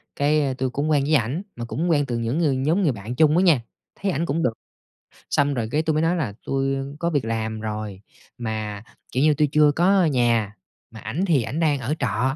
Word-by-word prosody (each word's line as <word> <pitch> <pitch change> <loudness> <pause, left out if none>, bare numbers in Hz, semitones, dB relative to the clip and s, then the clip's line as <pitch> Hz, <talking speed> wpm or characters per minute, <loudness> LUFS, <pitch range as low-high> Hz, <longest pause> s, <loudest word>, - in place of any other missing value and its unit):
cái 145 -2 +1
tui 130 0 -1
cũng 145 +4 -2
quen 145 -2 +3
với 155 +2 +2
ảnh, 135 - 0
mà 120 -1 -5
cũng 165 +8 -2
quen 145 -3 +3
từ 120 -2 -3
những 115 +5 -1
ngừ 155 -5 +2
nhóm 155 +9 +1
người 150 - +3
bạn 110 +2 -6
chung 155 +1 +4
đó - - +4
nha, 165 -10 +4 0.4
thấy 200 - 0
ảnh 165 +1 -1
cũng 165 +2 -1
được. 115 - +1 0.8
Xong 145 0 +2
rồi 115 -2 -1
cái, 155 - +2
tui 155 - +1
mới 155 +1 +1
nói 170 +2 +2
là 120 -11 -2
tui 135 0 0 0.2
có 170 - 0
việc 145 -7 0
làm 110 -1 -2
rồi, 105 -3 -5 0.4
mà, 110 -3 -4 0.3
kiểu 130 - +1
như, 155 0 +5
tui 150 -1 +2
chưa 150 -1 +5
có 180 +4 +3
nhà, 120 -7 +1 0.4
mà 110 - -11
ảnh 125 - -3
thì 150 -8 +3
ảnh 140 +7 -4
đang 150 -4 +2
ở 130 +5 -2
trọ. 130 +5 0
135 Hz, 235 wpm, -23 LUFS, 115-155 Hz, 0.8 s, như